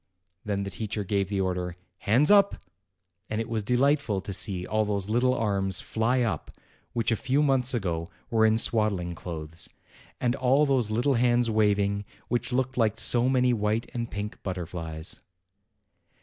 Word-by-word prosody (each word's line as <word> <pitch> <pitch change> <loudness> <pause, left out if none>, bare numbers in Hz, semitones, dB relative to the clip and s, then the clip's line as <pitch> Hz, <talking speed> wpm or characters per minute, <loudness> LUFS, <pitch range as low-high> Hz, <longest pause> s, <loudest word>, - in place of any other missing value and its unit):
Then 100 -1 -2
the 100 - -5
teacher 110 -1 -3
gave 100 0 -1
the 100 -1 -1
order, 90 -2 -2 0.2
"Hands 130 - +4
up!" 200 -1 +5 0.7
and 110 - -2
it 115 - -3
was 115 -1 -2
delightful 125 -2 +1
to 100 - -6
see 95 -2 +2
all 110 0 0
those 100 -1 -2
little 125 +2 +2
arms 100 -5 0
fly 120 +3 0
up, 115 -4 -2 0.4
which 115 0 0
a - - +3
few 135 +6 +1
months 130 -3 +1
ago 85 -6 -2 0.2
were 110 -1 +3
in 110 0 +4
swaddling 105 -7 +2
clothes, 80 -1 -5 0.5
and 120 0 0
all 135 +2 +3
those 130 -6 +1
little 120 +6 +1
hands 120 -1 +2
waving, 100 -2 +1 0.3
which 120 +1 -1
looked 130 0 -1
like 110 -2 +1
so 120 +2 +4
many 125 -1 +3
white 110 +1 -1
and 120 -1 -3
pink 105 +1 -6
butterflies. 85 -3 -4
110 Hz, 165 wpm, -27 LUFS, 100-125 Hz, 0.7 s, up